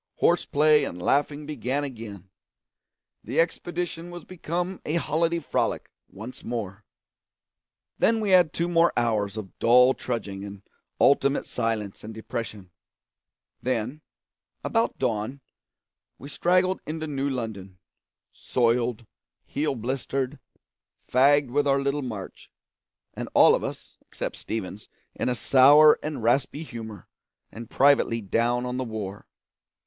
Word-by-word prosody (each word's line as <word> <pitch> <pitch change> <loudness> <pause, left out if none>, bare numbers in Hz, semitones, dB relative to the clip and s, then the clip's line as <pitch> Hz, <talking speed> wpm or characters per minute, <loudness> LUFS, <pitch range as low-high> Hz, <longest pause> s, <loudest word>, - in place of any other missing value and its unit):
Horse 175 0 +2
play 150 +1 +4
and 90 - -4
laughing 145 +8 0
began 145 -1 -2
again; 110 -8 -8 0.9
the 125 +8 -2
expedition 175 0 -2
was 175 -2 -9
become 180 +1 -4
a 155 - -2
holiday 165 0 +1
frolic 165 - -2 0.2
once 110 +6 -10
more. 105 -4 -5 1.2
Then 225 0 +3
we 210 -3 -1
had 180 -4 +6
two 170 - -1
more 170 -1 +4
hours 110 -3 0
of 100 -4 -8
dull 125 +2 +6
trudging 100 -7 -4
and 100 0 -9 0.4
ultimate 140 0 +3
silence 110 -4 -3
and 110 +1 -8
depression; 110 -4 -6 0.9
then, 125 +4 -2 0.6
about 225 0 0
dawn, 120 +1 -2 0.8
we 140 - -10
straggled 185 +4 +1
into 155 +1 -4
New 140 -2 -2
London, 110 -7 -5 0.6
soiled, 120 -1 0 0.4
heel 145 -1 -2
blistered, 130 +3 -3 0.7
fagged 140 +1 +4
with 145 +2 +1
our 140 0 +3
little 140 +1 -1
march, 110 -8 -7 0.6
and - - -6
all - - +7
of - - 0
us - - -7
except - - -6
Stevens 105 -2 -6 0.2
in - - -2
a 125 - 0
sour 145 +5 +6
and 150 -6 -5
raspy 135 +6 +1
humour 110 -7 -9 0.4
and 115 0 -9
privately 140 -4 +3
down 115 +4 0
on 125 0 -3
the 130 - -1
war. 105 -4 -6
130 Hz, 125 wpm, -26 LUFS, 110-150 Hz, 1.2 s, all